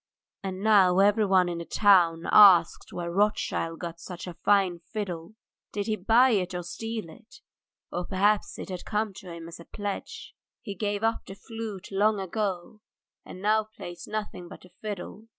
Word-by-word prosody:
And 190 0 -5
now 195 -4 +5
everyone 195 -2 +4
in 170 -1 -3
the - - -4
town 175 -6 +4
asks 185 -5 +6
where 170 -1 -4
Rothschild 195 -4 0
got 170 -1 -7
such 180 -1 -8
a 180 - -7
fine 190 -1 +2
fiddle. 185 -3 -5 0.4
Did 205 -1 -2
he 220 - 0
buy 230 +6 +4
it 185 -4 0
or 175 - -3
steal 225 +2 -5
it? 230 +8 -16 0.5
Or 175 0 -3
perhaps 205 +2 +1
it - - -7
had 185 -1 -6
come 210 -1 -2
to 185 -2 -10
him 165 -1 -8
as 170 - -10
a 170 - -12
pledge. 205 -1 -6 0.3
He 205 - -5
gave 205 +1 -3
up 225 0 0
the 195 - -8
flute 220 -3 -7
long 205 +2 +2
ago, 195 +1 -3 0.4
and 185 - -10
now 215 +1 +3
plays 175 -5 -10
nothing 210 -4 -5
but - - -12
the 180 - -16
fiddle. 210 +1 -7
195 Hz, 175 wpm, -27 LUFS, 175-215 Hz, 0.5 s, asks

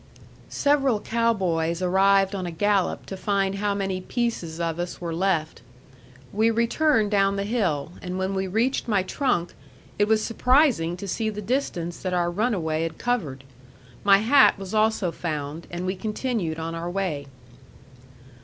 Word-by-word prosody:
Several 275 -6 +2
cow 230 +2 +1
boys 170 -5 -1
arrived 195 +2 +3
on 185 -2 -3
a - - -4
gallop 200 +2 0
to 195 - -6
find 195 0 0
how 205 -1 0
many 195 -2 -2
pieces 185 -8 -3
of 165 0 -2
us 175 0 -4
were 170 -2 -4
left. 165 -3 -1 0.7
We 220 +3 +3
returned 230 0 +2
down 195 -1 +3
the 200 - -1
hill; 185 -10 -1
and 180 0 -4
when 190 +1 -1
we 190 0 -1
reached 230 +9 0
my 205 -4 +2
trunk, 190 -7 -1 0.5
it 205 - +3
was 215 0 +2
surprising 240 - +2
to 200 - -7
see 220 +4 -1
the 210 -1 -6
distance 195 -7 -2
that 185 -1 -2
our 175 -1 +1
runaway 175 -6 0
had 165 -1 -3
covered. 160 - -2 0.6
My 200 -1 +7
hat 255 +6 +5
was 195 0 -7
also 215 -4 +2
found, 155 -1 -5
and 175 +1 -5
we 185 +1 -1
continued 210 -5 -2
on 165 0 -4
our 165 +1 -4
way. 175 -7 -3
195 Hz, 165 wpm, -25 LUFS, 170-220 Hz, 0.7 s, My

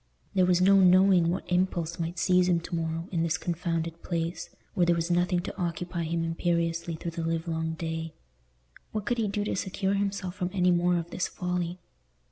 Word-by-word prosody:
There 185 -2 +3
was 180 -1 +3
no 195 +1 +6
knowing 185 -2 +5
what 180 +3 -1
impulse 175 -2 0
might 170 +1 -3
seize 180 +2 +3
him 170 -1 +3
to 170 - -9
morrow, 165 0 -2
in 170 -3 0
this 165 -1 +1
confounded 165 0 -3
place, 170 0 -3 0.2
where 180 - +2
there 170 - +4
was 170 +1 -1
nothing 175 +1 +2
to - - -6
occupy 175 0 -2
him 165 +1 -1
imperiously 170 0 -1
through 170 +1 -5
the 165 0 -4
livelong 160 0 -1
day. 160 0 -4 0.8
What 215 -2 -2
could 240 -1 0
he 220 - +1
do 205 +1 -1
to 210 - -2
secure 190 +1 -1
himself 200 -2 -1
from 180 -2 -2
any 180 -2 +3
more 175 0 +3
of 170 +1 -4
this 180 - -1
folly? 180 -1 -3
175 Hz, 195 wpm, -28 LUFS, 165-185 Hz, 0.8 s, no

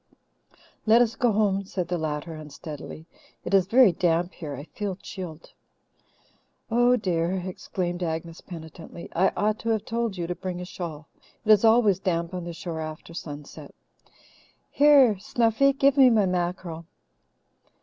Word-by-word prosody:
"Let 230 +3 +7
us 225 -1 -3
go 240 0 +2
home," 200 -2 +1
said 185 -2 -4
the 175 -1 -2
latter 155 +1 -3
unsteadily. 155 0 -9 0.4
"It 180 - -4
is 190 -2 +4
very 240 -1 +6
damp 175 +1 0
here 150 -4 -6
I 140 - -8
feel 195 +4 -5
chilled." 175 -4 -9 1.2
"Oh, 245 +2 +4
dear!" 180 -5 0
exclaimed 180 -1 -4
Agnes 165 0 -4
penitently. 165 0 -10
"I 185 +3 +4
ought 215 +1 +1
to 230 - -3
have 220 -2 0
told 230 -4 -2
you 175 - -2
to 180 - -2
bring 180 +1 -5
a 180 - -5
shawl. 165 -4 -7 0.4
It 215 - +5
is 210 0 +6
always 220 -4 +5
damp 170 -2 -1
on 180 -2 -4
the 170 - -5
shore 165 -1 -5
after 155 +1 -8
sunset. 145 -3 -9 1.0
Here, 275 -8 +5
Snuffy, 230 +6 +2
give 275 +1 +2
me 265 -2 +8
my 220 -4 +3
mackerel. 175 -2 -3
180 Hz, 155 wpm, -26 LUFS, 165-215 Hz, 1.2 s, me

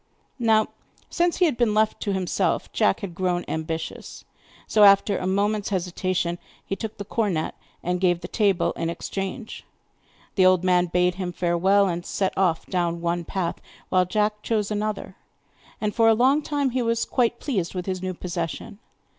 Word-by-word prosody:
Now, 220 -2 +3 0.4
since 345 0 +1
he 360 - +4
had 295 -8 0
been 230 -4 +2
left 215 0 +1
to 205 - -1
himself, 190 -2 -1
Jack 100 - +2
had 195 -4 -5
grown 180 0 -1
ambitious, 160 0 -5 0.4
so, 215 - +4
after 200 0 +6
a 185 - -2
moment's 205 +2 0
hesitation, 180 -2 -1 0.3
he 195 - -2
took 220 +1 -6
the 200 - -6
cornet 195 -7 -1 0.3
and 180 +1 -1
gave 175 -2 +2
the - - -6
table 200 -5 +1
in 165 - -3
exchange. 195 +6 -5 0.7
The 185 - +4
old 185 -1 +4
man 180 -1 +3
bade 180 +1 +2
him 180 -1 -2
farewell, 185 +3 +2
and 175 -1 -2
set 190 +2 -1
off 180 -4 +1
down 170 -2 -1
one 170 0 -1
path, 175 -2 -2 0.3
while 185 -1 +3
Jack 210 +2 0
chose 215 -2 -1
another, 210 0 -3 0.6
and 210 -1 -1
for 230 -1 +4
a 225 - +5
long 265 +6 +4
time 285 -3 -1
he 255 +1 0
was 230 -1 0
quite 240 -2 +1
pleased 195 - -2
with 180 -1 -3
his 185 -1 -3
new 185 -1 -3
possession. 175 +2 -5
190 Hz, 175 wpm, -24 LUFS, 175-215 Hz, 0.7 s, after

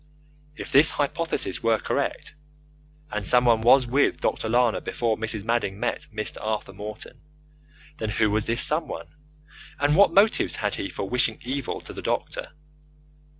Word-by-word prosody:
If - - -8
this 145 +4 +7
hypothesis 145 - -1
were 115 -1 +2
correct, 140 +2 -3 0.8
and 105 -1 -3
someone 120 +1 +4
was 125 +3 +5
with 135 +4 +1
Dr. 110 - -2
Lana 120 -1 +2
before 115 -2 -1
Mrs. 110 -2 -3
Madding 110 -3 -1
met - - -3
Mr. 110 0 -4
Arthur 110 -2 -3
Morton, 105 +2 -9 0.8
then 110 - -3
who 110 0 +1
was 110 0 0
this 115 +2 +2
someone, 155 +2 0 0.7
and 145 +1 +2
what 200 +3 +6
motives 205 +3 +3
had 105 -2 -2
he 95 - -4
for 100 - -5
wishing 115 0 0
evil 135 0 -4
to - - -9
the - - -7
doctor? - - -3
115 Hz, 150 wpm, -25 LUFS, 110-135 Hz, 0.8 s, this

